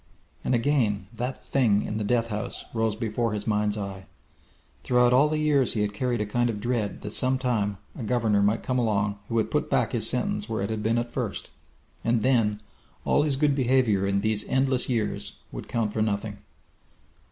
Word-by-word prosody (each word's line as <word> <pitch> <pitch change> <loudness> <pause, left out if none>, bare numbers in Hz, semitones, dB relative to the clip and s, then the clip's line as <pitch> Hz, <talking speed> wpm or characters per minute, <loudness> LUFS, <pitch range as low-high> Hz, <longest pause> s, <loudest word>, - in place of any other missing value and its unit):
And 130 - +1
again 115 -6 +1
that 125 +3 -4
Thing 110 -7 +2
in 105 - -3
the - - -1
death 115 +2 +1
house 105 -1 -4
rose 110 -2 0
before 115 0 -1
his 105 -1 -3
mind's 105 -1 +1
eyes. 100 -2 -6 0.8
Throughout 125 0 +3
all 140 +4 +5
the 155 - 0
years 145 -5 +2
he 105 - +1
had 105 0 -1
carried 120 +2 -1
a - - 0
kind 120 +3 0
of 105 -3 -3
dread 115 -2 -2
that 105 0 -6
sometime 125 -6 +1 0.2
a - - -7
governor 110 -3 +1
might 105 +3 +1
come 130 0 0
along 105 -3 0
who 115 - -2
would 110 - +1
put - - 0
back - - +1
his - - +3
sentence 105 +2 -1
where 110 -3 -1
it 100 - -2
had 110 -1 -2
been 110 +2 +1
at 120 0 -2
first - - -4 0.5
and 115 -2 +1
then 110 -5 +2 0.4
all - - +3
his 145 -2 +1
good 145 +1 +2
behaviour 125 -7 +2
in 100 0 +1
these 110 0 0
endless 130 -1 +2
years 115 -4 -2 0.2
would - - -7
count 110 -3 -1
for 110 - -1
nothing. 105 -1 -2
115 Hz, 195 wpm, -26 LUFS, 105-125 Hz, 0.8 s, all